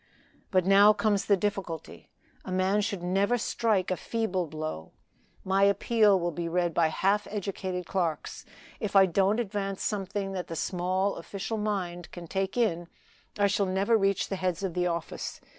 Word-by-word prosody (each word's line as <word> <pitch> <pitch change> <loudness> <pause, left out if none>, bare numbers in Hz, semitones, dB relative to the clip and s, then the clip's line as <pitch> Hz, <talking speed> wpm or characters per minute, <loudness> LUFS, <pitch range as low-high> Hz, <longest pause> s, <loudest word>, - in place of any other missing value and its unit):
"But 185 -2 +2
now 200 +2 +7
comes 210 -2 +1
the 200 - +4
difficulty. 190 -5 -4 0.3
A - - -7
man 190 +3 +2
should 200 -4 -3
never 195 +6 +2
strike 215 -5 0
a - - +2
feeble 190 -5 -2
blow. 155 - -6 0.5
My 190 +1 +1
appeal 200 0 +4
will 175 0 -1
be 170 +1 -4
read 175 0 0
by 165 0 +3
half 200 +6 +1
educated 190 -3 -4
clerks. 170 -5 -2 0.4
If 210 -2 -4
I 195 -1 +8
don't 195 +4 +2
advance 195 -3 -3
something 200 -1 -2
that 185 -2 -4
the 165 - -5
small 185 +4 -1
official 200 +5 -4
mind 180 -5 -3
can 175 -1 -8
take 190 +5 -2
in, 175 -8 +1 0.5
I 205 - +3
shall 200 0 +1
never 195 +5 +2
reach 195 -3 +1
the 195 - -2
heads 185 0 -2
of 190 -3 -2
the 180 0 0
office. 170 -1 -4
195 Hz, 170 wpm, -28 LUFS, 180-205 Hz, 0.5 s, I